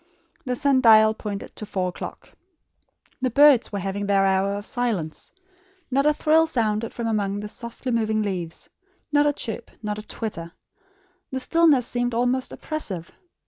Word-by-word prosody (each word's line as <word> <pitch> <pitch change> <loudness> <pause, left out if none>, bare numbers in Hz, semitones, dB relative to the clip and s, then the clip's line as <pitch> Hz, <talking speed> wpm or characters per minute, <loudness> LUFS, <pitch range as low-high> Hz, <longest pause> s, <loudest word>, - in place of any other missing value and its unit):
The 250 -1 -1
sun 275 -1 +2
dial 220 -2 +7
pointed 210 -2 -6
to - - -6
four 185 -3 -1
o'clock. - - -8 0.9
The 255 - +1
birds 280 -1 +5
were 205 - -3
having 200 +1 -3
their 195 -1 +3
hour 195 +1 +1
of 205 0 -6
silence. 220 -12 -3 0.6
Not 275 +3 +2
a 300 - +5
trill 320 +2 +3
sounded 225 -6 -1
from 235 - -5
among 205 -3 0
the 210 +1 -5
softly 235 +4 -6
moving 220 -2 +1
leaves, 180 -5 -4 0.4
not 290 0 +4
a 290 - +2
chirp, 230 -4 -5
not 210 0 -3
a 215 - -11
twitter. 170 -7 -5 0.8
The 260 - -3
stillness 300 -2 +4
seemed 245 -1 -1
almost 250 +2 0
oppressive. 195 - -5
225 Hz, 160 wpm, -24 LUFS, 200-255 Hz, 0.9 s, dial